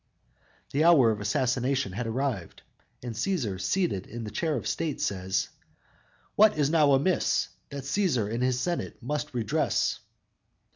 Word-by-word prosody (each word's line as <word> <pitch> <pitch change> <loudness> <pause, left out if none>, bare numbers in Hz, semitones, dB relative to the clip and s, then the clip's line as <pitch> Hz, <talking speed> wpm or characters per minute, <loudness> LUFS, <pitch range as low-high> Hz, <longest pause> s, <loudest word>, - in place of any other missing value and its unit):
"_ - - -24
The 145 +3 +2
hour 150 -9 +6
of 105 -1 -4
assassination 125 +2 0
has 115 +5 -4
arrived, 115 -6 -3 0.4
and 120 -2 -4
Cæsar, 115 - -2
seated 165 - 0
in 115 +1 -7
the 105 - -6
chair 155 +8 -1
of - - -5
state, 160 -3 -2
says: 95 -1 -1 0.9
_"What 215 -5 +5
is 145 -1 +2
now 150 -4 +5
amiss 155 +7 +2 0.2
That 140 -1 -6
Cæsar 135 - 0
and 120 - -2
his 125 0 +1
senate 175 +5 -2
must 150 +1 -3
redress?" 115 -4 0
130 Hz, 150 wpm, -27 LUFS, 110-150 Hz, 0.9 s, hour